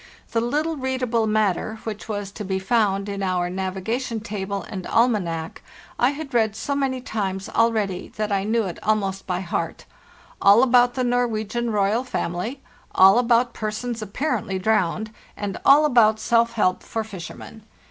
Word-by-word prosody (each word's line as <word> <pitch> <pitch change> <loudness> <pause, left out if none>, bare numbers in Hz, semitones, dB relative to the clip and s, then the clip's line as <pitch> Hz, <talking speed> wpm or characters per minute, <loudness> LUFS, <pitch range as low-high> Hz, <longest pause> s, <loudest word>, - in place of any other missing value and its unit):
The 230 - +1
little 300 +7 -1
readable 255 -4 0
matter 215 -1 0
which 215 0 -6
was 205 -2 -4
to 210 - -7
be 190 -1 -2
found 200 -1 +1
in 200 -1 -4
our 180 -2 0
nav 190 0 -3
igation 225 +3 -3
table 200 -2 -4
and 190 -4 -6
almanac 185 -9 0 0.4
I 245 - +4
had 285 -1 -6
read 220 -3 +2
so 255 +6 -3
many 270 -2 -1
times 195 -5 -3
already 215 -5 +1
that 215 -1 -2
I 195 -1 +1
knew 225 +2 +1
it 180 -4 -5
almost 195 -3 -1
by 180 -1 -1
heart 175 - -3 0.6
—all 205 +5 +7
about 245 -1 +4
the 255 - 0
Norwegian 240 -1 0
royal 210 +2 +1
family, 230 +2 -4 0.3
all 195 +4 +7
about 240 0 +2
persons 220 +2 -4
apparently 215 -2 -2
drowned, 215 +1 0 0.3
and 200 -2 -4
all 290 +2 +7
about 225 -6 +4
self 230 +1 +2
help 185 -5 +1
for 225 - -4
fishermen. 205 +2 -9
215 Hz, 160 wpm, -23 LUFS, 195-240 Hz, 0.6 s, all